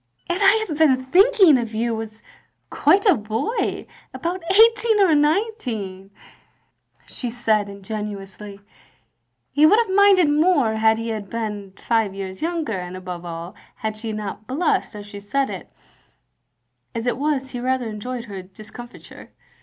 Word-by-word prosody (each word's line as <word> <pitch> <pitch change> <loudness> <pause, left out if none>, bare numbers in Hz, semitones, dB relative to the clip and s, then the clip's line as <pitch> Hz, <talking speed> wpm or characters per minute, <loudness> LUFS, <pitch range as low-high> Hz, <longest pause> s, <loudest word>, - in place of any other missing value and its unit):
"And 350 +1 -1
I 425 +3 +4
have 305 -3 -5
been 260 -5 +3
thinking 375 - +5
of 230 -2 -5
you 225 0 -1
as 220 0 -10 0.5
quite 395 +3 +3
a 400 - +7
boy, 225 - -2 0.3
about 355 +2 -3
eighteen 445 +1 +5
or 380 -5 +5
nineteen," 290 - -1 1.0
she 245 - -6
said, 220 -3 0
ingenuously. 200 0 -7 0.9
He 300 +2 +5
would 420 - +5
have 445 -5 +1
minded 395 -4 +6
more 295 -6 +3
had 220 0 +3
he 230 0 -3
been 205 -2 -5
five 225 -4 0
years 190 -1 -7
younger, 320 - -2
and 180 +1 -7
above 180 -2 -7
all, 170 +2 -7 0.2
had 220 -1 -4
she 220 +1 -5
not 210 0 -6
blushed 295 -4 0
as 205 -1 -8
she 205 0 -9
said 270 +7 -1
it; - - -8 1.2
as 230 0 -3
it 245 - 0
was, 275 -3 -1
he 245 - -5
rather 255 -1 -1
enjoyed 235 +3 -5
her 200 -4 -7
discomfiture. 215 +6 -12
235 Hz, 145 wpm, -22 LUFS, 210-320 Hz, 1.2 s, a